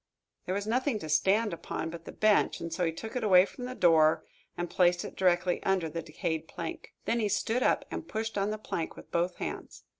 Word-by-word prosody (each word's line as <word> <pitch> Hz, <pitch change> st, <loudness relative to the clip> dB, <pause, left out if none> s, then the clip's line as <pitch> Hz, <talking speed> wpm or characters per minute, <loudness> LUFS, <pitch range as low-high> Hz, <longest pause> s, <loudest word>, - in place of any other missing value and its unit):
There 185 Hz, -, 0 dB
was 200 Hz, 0 st, -2 dB
nothing 250 Hz, +2 st, +1 dB
to 180 Hz, -, -7 dB
stand 195 Hz, +7 st, +3 dB
upon 160 Hz, -1 st, -4 dB
but 165 Hz, 0 st, -9 dB
the -, -, -7 dB
bench, 215 Hz, -1 st, +3 dB
and 165 Hz, -1 st, -5 dB
so 180 Hz, -, -1 dB
he 165 Hz, -, +1 dB
took 220 Hz, +9 st, -8 dB
it 250 Hz, -, -1 dB
away 185 Hz, -3 st, +7 dB
from 250 Hz, +4 st, -8 dB
the 255 Hz, 0 st, -5 dB
door 160 Hz, -5 st, +4 dB, 0.3 s
and 175 Hz, -, -2 dB
placed 175 Hz, 0 st, +2 dB
it -, -, -8 dB
directly 180 Hz, -1 st, +2 dB
under 185 Hz, -4 st, +1 dB
the 165 Hz, +2 st, -4 dB
decayed 160 Hz, +1 st, -3 dB
plank. 165 Hz, -1 st, -7 dB
Then 235 Hz, -, +1 dB
he 210 Hz, -2 st, +1 dB
stood 220 Hz, +5 st, 0 dB
up -, -, +2 dB
and 325 Hz, -, -5 dB
pushed 225 Hz, +1 st, -3 dB
on 200 Hz, 0 st, +1 dB
the 215 Hz, -, -2 dB
plank 170 Hz, -6 st, -4 dB
with -, -, -13 dB
both 175 Hz, +1 st, 0 dB
hands. -, -, -6 dB
185 Hz, 230 wpm, -30 LUFS, 170-215 Hz, 0.3 s, away